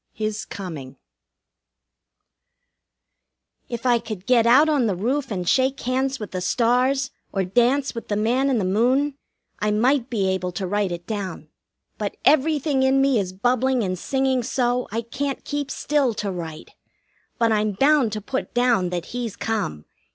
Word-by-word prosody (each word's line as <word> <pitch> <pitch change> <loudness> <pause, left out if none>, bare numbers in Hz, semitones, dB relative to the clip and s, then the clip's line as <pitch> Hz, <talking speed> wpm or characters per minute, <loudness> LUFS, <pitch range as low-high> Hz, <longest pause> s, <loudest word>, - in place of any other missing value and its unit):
XIII 215 - -2
HIS 215 0 -3
COMING 150 -9 -7 2.7
If 235 0 -5
I 240 -2 +4
could 210 -5 -7
get 240 -2 +4
out 275 +6 +6
on 285 -6 +2
the 200 - 0
roof 255 +9 -1
and 180 -5 -3
shake 260 +4 +2
hands 260 +2 -1
with 210 - -6
the 185 - -3
stars, 255 +6 +1 0.2
or 195 -2 -1
dance 245 +8 +2
with 230 - -7
the 205 - -1
man 245 +6 +1
in 260 - +2
the 200 - 0
moon, 250 +9 +2 0.5
I 210 - 0
might 245 +4 +2
be 205 -5 0
able 185 -1 -2
to 190 +2 -3
write 200 0 0
it 175 0 -5
down; 200 -3 -5 0.5
but - - -3
everything 300 -2 +3
in 265 +1 +3
me 270 -3 +3
is 185 -2 -2
bubbling 245 +5 +1
and 185 -2 -1
singing 265 +6 0
so, 245 +1 0
I 225 +2 -1
can't 270 +4 -4
keep 290 -1 -3
still 280 -7 0
to 205 -1 -2
write. 165 -3 -7 0.7
But 230 -2 +2
I'm 215 -1 +1
bound 270 +1 +3
to 215 - -3
put 260 +4 -4
down 240 -7 +2
that 175 -1 -3
he's 240 -4 -3
come. 75 - -3
235 Hz, 170 wpm, -23 LUFS, 200-265 Hz, 2.7 s, out